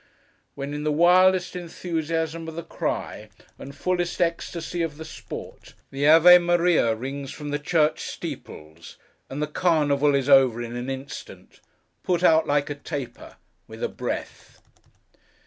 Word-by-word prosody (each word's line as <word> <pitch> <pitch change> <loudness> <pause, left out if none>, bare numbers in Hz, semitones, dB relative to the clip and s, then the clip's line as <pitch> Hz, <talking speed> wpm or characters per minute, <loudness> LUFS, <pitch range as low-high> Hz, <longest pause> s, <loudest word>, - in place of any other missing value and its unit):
—when 140 +1 -5
in 150 0 -4
the 155 - 0
wildest 180 +3 +4
enthusiasm 165 -2 -3
of 160 - -7
the 170 - -5
cry, - - -4 0.3
and 140 +1 -10
fullest 175 -1 -2
ecstasy 170 0 -2
of 160 -3 -3
the 160 - -8
sport, - - -10 0.2
the 140 +2 0
Ave 170 +3 +8
Maria 175 -9 +2
rings 135 +4 -6
from 150 -1 -7
the 145 - -1
church 155 0 +1
steeples, 80 +2 -8 0.3
and 145 +3 -3
the - - -2
Carnival 150 -3 +2
is 135 -1 0
over 135 -4 +5
in 120 0 -5
an 120 +2 -4
instant—put 140 +5 -7
out 160 -2 +4
like 145 0 0
a - - 0
taper, 140 -2 -7 0.3
with - - -9
a - - 0
breath! - - -6
150 Hz, 145 wpm, -24 LUFS, 140-170 Hz, 0.3 s, Ave